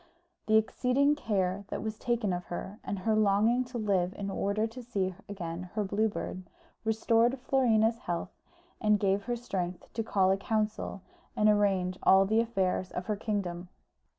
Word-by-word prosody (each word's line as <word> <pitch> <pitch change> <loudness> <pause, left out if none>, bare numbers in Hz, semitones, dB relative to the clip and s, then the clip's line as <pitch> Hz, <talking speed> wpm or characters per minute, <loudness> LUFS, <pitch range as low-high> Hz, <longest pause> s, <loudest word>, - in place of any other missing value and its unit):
The 220 0 +5
exceeding 250 +6 +2
care 200 -8 -1
that - - -4
was 220 -1 -4
taken 235 -5 0
of 175 0 -4
her, 190 +4 -6
and 200 +1 -3
her 215 +4 +1
longing 215 +4 +3
to 245 0 -6
live 195 -4 0
in 200 -1 -3
order 200 +3 0
to 230 +3 -7
see 200 -6 -2 0.2
again 180 -2 -5
her 215 - +1
Blue 210 +3 +1
Bird, 185 -2 -5 0.4
restored 225 +3 +2
Florina's 230 -4 +2
health, 175 -4 -3 0.5
and 210 -1 +3
gave 195 0 +1
her 240 0 -1
strength 185 -7 -4
to 225 - -1
call 190 -3 +2
a 195 - +2
council 210 -1 -2 0.3
and 210 - +3
arrange 195 -3 +2
all 190 0 +6
the 220 +3 +2
affairs 190 -5 -1
of 180 - -4
her 210 - -1
kingdom. 185 -5 -3
205 Hz, 170 wpm, -30 LUFS, 190-225 Hz, 0.5 s, all